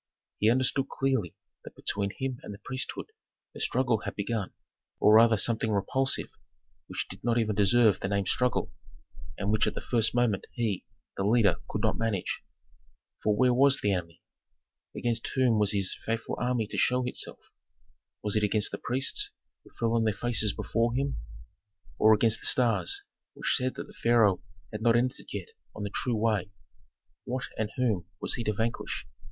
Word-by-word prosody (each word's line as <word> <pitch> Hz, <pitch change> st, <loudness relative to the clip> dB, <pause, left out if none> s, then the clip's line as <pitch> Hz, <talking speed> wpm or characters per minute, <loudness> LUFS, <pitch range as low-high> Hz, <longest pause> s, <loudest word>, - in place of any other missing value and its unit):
He 105 Hz, -, +4 dB
understood 130 Hz, +2 st, +1 dB
clearly 130 Hz, -10 st, -1 dB, 0.3 s
that -, -, -11 dB
between 100 Hz, -1 st, -2 dB
him 130 Hz, -2 st, -3 dB
and -, -, -8 dB
the -, -, -14 dB
priesthood 130 Hz, -, -4 dB, 0.4 s
a -, -, -8 dB
struggle 125 Hz, -4 st, +1 dB
had -, -, -5 dB
begun, 105 Hz, -1 st, -2 dB, 0.5 s
or 105 Hz, -, +6 dB
rather 115 Hz, 0 st, +7 dB
something 110 Hz, +1 st, +2 dB
repulsive 130 Hz, +6 st, 0 dB, 0.6 s
which -, -, -3 dB
did -, -, -10 dB
not 120 Hz, -1 st, +2 dB
even 110 Hz, -2 st, +1 dB
deserve 105 Hz, +1 st, +4 dB
the -, -, -2 dB
name 100 Hz, 0 st, 0 dB
struggle, 125 Hz, +6 st, 0 dB, 0.6 s
and 100 Hz, +1 st, -1 dB
which 110 Hz, -, +3 dB
at -, -, -2 dB
the -, -, -3 dB
first 115 Hz, -1 st, +2 dB
moment 120 Hz, -5 st, +1 dB
he, 115 Hz, -6 st, -2 dB, 0.3 s
the 95 Hz, -, -1 dB
leader, 105 Hz, -4 st, +4 dB
could -, -, -3 dB
not -, -, +1 dB
manage. 110 Hz, -5 st, -1 dB, 0.8 s
For 105 Hz, -1 st, +2 dB
where 125 Hz, +3 st, +4 dB
was 135 Hz, +2 st, +4 dB
the 100 Hz, -, +1 dB
enemy? 85 Hz, -2 st, -5 dB, 0.7 s
Against 115 Hz, -1 st, -1 dB
whom 125 Hz, -5 st, +3 dB
was 105 Hz, -1 st, +3 dB
his 100 Hz, -3 st, 0 dB
faithful 115 Hz, +1 st, -2 dB
army 125 Hz, -2 st, +1 dB
to -, -, -2 dB
show 125 Hz, 0 st, +2 dB
itself? 125 Hz, -, -4 dB, 0.9 s
Was 105 Hz, 0 st, -1 dB
it 110 Hz, -, +3 dB
against 105 Hz, 0 st, +2 dB
the -, -, -5 dB
priests 130 Hz, +3 st, 0 dB, 0.3 s
who -, -, -17 dB
fell 115 Hz, -1 st, +1 dB
on 115 Hz, -1 st, +2 dB
their 110 Hz, -2 st, +1 dB
faces 110 Hz, -1 st, +2 dB
before 115 Hz, +4 st, 0 dB
him? 135 Hz, +1 st, -1 dB, 0.8 s
Or 110 Hz, 0 st, +7 dB
against 110 Hz, +1 st, +3 dB
the -, -, -2 dB
stars 130 Hz, -, +2 dB, 0.3 s
which -, -, 0 dB
said 130 Hz, 0 st, 0 dB
that -, -, -5 dB
the -, -, -15 dB
pharaoh 115 Hz, -5 st, +3 dB, 0.3 s
had 105 Hz, -1 st, -5 dB
not 115 Hz, 0 st, +4 dB
entered 125 Hz, +3 st, 0 dB
yet -, -, -5 dB, 0.3 s
on 105 Hz, -, -5 dB
the 100 Hz, -, -4 dB
true 120 Hz, +2 st, -1 dB
way? 105 Hz, -4 st, +1 dB, 0.8 s
What 125 Hz, 0 st, -3 dB
and 110 Hz, -1 st, -2 dB
whom 110 Hz, -9 st, 0 dB
was -, -, -2 dB
he 120 Hz, -, -3 dB
to 105 Hz, -, +1 dB
vanquish? 115 Hz, +3 st, -2 dB
115 Hz, 180 wpm, -29 LUFS, 105-125 Hz, 0.9 s, rather